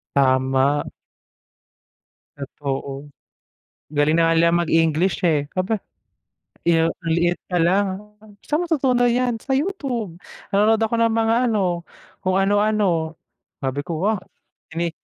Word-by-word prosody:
Tama. 130 +1 +2 1.5
Totoo. 140 0 -5 0.8
Galing 150 +1 +2
na 165 0 +3
nga 165 - +3
nilang 170 +1 +3
mag-English 165 +3 +1
eh, 150 -3 +1
aba. 200 +3 -1 0.8
Yu 165 -1 +3
ang 165 0 -6
liit 175 +1 +1
pa 180 - -1
lang, 190 +4 +3 0.6
"Saan 305 +3 -1
mo - - -1
natutunan 255 -6 +2
yan? 245 0 +1
Sa 265 +4 -2
YouTube. 265 - -2 0.3
Nanonood 215 +2 +3
ako 225 +1 0
ng 230 -1 +2
mga 225 0 +2 0.2
ano, 180 -5 -1 0.4
kung 185 +1 +1
ano-ano." 195 -5 +1 0.5
Sabi 135 +1 -1
ko, 165 0 -3
"Wow 215 +1 +1 0.6
ini 170 0 -1
175 Hz, 125 wpm, -22 LUFS, 160-220 Hz, 1.5 s, na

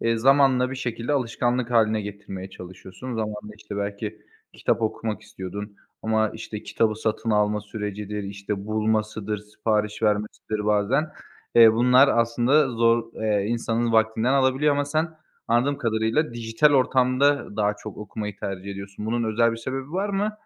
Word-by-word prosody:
eee, 115 0 +1
zamanla 130 0 +4
bir 135 - -5
şekilde 120 +1 -3
alışkanlık 125 -2 0
hâline 110 -2 +3
getirmeye 100 -2 -7
çalışıyorsun. 95 +7 -9
Zamanla, 105 -1 -4
işte, 105 -1 -8
belki 100 +1 -4 0.3
kitap 115 - -1
okumak 110 -1 -2
istiyordun 100 +2 -7 0.3
ama, 110 -1 +1
işte, 110 -1 -7
kitabı 110 -1 0
satın 110 +1 -2
alma 105 0 +2
sürecidir, 105 0 -5
işte, 100 0 -5
bulmasıdır, 110 -1 -1
sipariş 105 +1 -2
vermesidir, 105 0 -1
bazen, 105 +9 +2 0.4
eee, 115 -1 +8
bunlar 125 +4 +5
aslında 120 +5 +3
zor. 115 -1 +2
Eee, 105 -2 +1
insanın 115 0 0
vaktinden 110 +2 +2
alabiliyor 135 +2 +3
ama 145 0 +1
sen 155 +3 0 0.4
anladığım 130 +5 +2
kadarıyla 115 +4 0
dijital 115 +6 +2
ortamda 130 -1 +2
daha 105 -1 +1
çok 110 0 -9
okumayı 105 -1 -6
tercih 95 0 -5
ediyorsun. 100 +2 -7
Bunun 115 +1 0
özel 115 +1 +3
bir 115 - -4
sebebi 130 +5 -5
var 195 +3 -1
mı? 205 +2 0
110 Hz, 145 wpm, -24 LUFS, 105-125 Hz, 0.4 s, eee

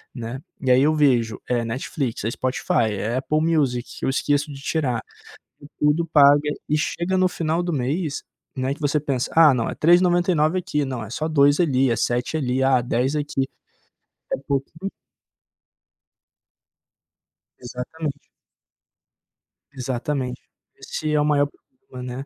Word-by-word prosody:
né? 120 +2 -6 0.2
E 130 -2 +2
aí 125 - +6
eu 155 +2 +3
vejo, 120 -7 +2
é 120 -2 +1
Netflix, 125 +1 -3
é 115 - -1
Spotify, 120 -3 0
é 110 +5 -2
Apple 155 +4 0
Music, 145 -7 +1 0.2
eu - - 0
esqueço 145 +2 0
de 135 - -10
tirar. 135 -7 -1 0.8
Tudo 150 +3 +2
paga 145 0 +6 0.2
e 150 - +2
chega 170 +4 -1
no 185 0 +4
final 165 0 -1
do 175 - -2
mês, 145 +3 -2 0.3
né, 130 +1 -1
que - - -19
você 150 0 +1
pensa: 135 -4 -2
"Ah, 160 -4 +7
não, 115 -2 -1
é - - -5
3,99 175 -1 +3
aqui. 160 -5 -1
Não, 130 -3 -4
é - - -9
só 155 +6 -2
2 145 -1 +4
ali, 135 -6 +3
é 115 - +1
7 125 +7 -1
ali, 130 -3 0
ah, 130 -1 +4
10 125 +4 0
aqui". 145 -2 -1 0.9
É - - +1
pouquinho 140 +7 -2 2.7
Exatamente. 140 +4 -5 1.5
Exatamente. 130 0 -3 0.3
Esse 155 -1 -4
é 150 - +3
o - - +1
maior 145 -1 +3 0.4
problema, 125 -1 -6
né? 135 - -6
140 Hz, 145 wpm, -23 LUFS, 125-155 Hz, 2.7 s, Ah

